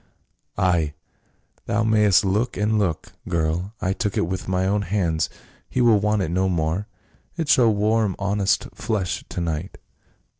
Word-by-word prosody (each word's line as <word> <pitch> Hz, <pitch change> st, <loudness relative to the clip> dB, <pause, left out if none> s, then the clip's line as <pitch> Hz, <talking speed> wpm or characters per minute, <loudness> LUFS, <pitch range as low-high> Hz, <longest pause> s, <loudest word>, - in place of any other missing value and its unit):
Ay! 85 Hz, -6 st, +1 dB, 0.7 s
thou 115 Hz, -, +1 dB
mayst 105 Hz, -3 st, +4 dB
look 110 Hz, +6 st, 0 dB
and 105 Hz, +1 st, +1 dB
look, 90 Hz, -7 st, -2 dB, 0.2 s
girl; 85 Hz, +5 st, -1 dB
I 95 Hz, -1 st, 0 dB
took 105 Hz, 0 st, -2 dB
it -, -, +2 dB
with 95 Hz, +2 st, -4 dB
my 95 Hz, 0 st, 0 dB
own 100 Hz, +2 st, +1 dB
hands, 90 Hz, -5 st, 0 dB, 0.4 s
he -, -, -2 dB
will 115 Hz, -4 st, +5 dB
want 105 Hz, 0 st, +1 dB
it 80 Hz, -, -2 dB
no 95 Hz, +2 st, +1 dB
more; 85 Hz, +4 st, -1 dB, 0.5 s
it 165 Hz, -3 st, -2 dB
shall 125 Hz, -5 st, +5 dB
warm 105 Hz, -1 st, +1 dB
honest 100 Hz, 0 st, +1 dB
flesh 105 Hz, -6 st, -2 dB
to -, -, -5 dB
night. 85 Hz, +1 st, -3 dB
100 Hz, 155 wpm, -23 LUFS, 90-105 Hz, 0.7 s, will